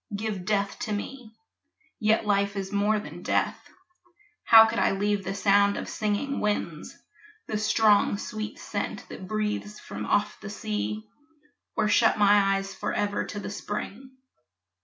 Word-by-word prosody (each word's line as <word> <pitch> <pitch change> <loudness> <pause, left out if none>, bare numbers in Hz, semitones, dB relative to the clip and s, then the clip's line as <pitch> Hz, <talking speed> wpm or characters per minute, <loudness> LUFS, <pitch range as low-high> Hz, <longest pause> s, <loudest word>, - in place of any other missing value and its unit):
Give 205 -3 -3
death 200 -1 0
to 215 - -3
me. 225 +2 -6 0.6
Yet 220 -1 +2
life 200 0 +1
is 195 -1 -4
more 205 +1 +2
than - - -9
death; - - -1 0.8
How 225 -1 +9
could 230 +1 -1
I - - +3
leave 205 0 0
the 195 +1 -4
sound 200 0 +3
of - - -5
singing 215 +6 -2
winds, 210 0 -2 0.5
The 215 - -2
strong 215 -1 +3
sweet 215 +1 -5
scent - - -5
that 185 - -8
breathes 210 0 -3
from 105 +1 -7
off 205 - +1
the - - -8
sea, 105 - -4 0.7
Or - - +1
shut 205 - +4
my 200 -1 +5
eyes 195 0 -4
forever 205 +1 -1
to 205 - -6
the 200 - -6
spring? 210 +5 -6
205 Hz, 150 wpm, -27 LUFS, 200-215 Hz, 0.8 s, How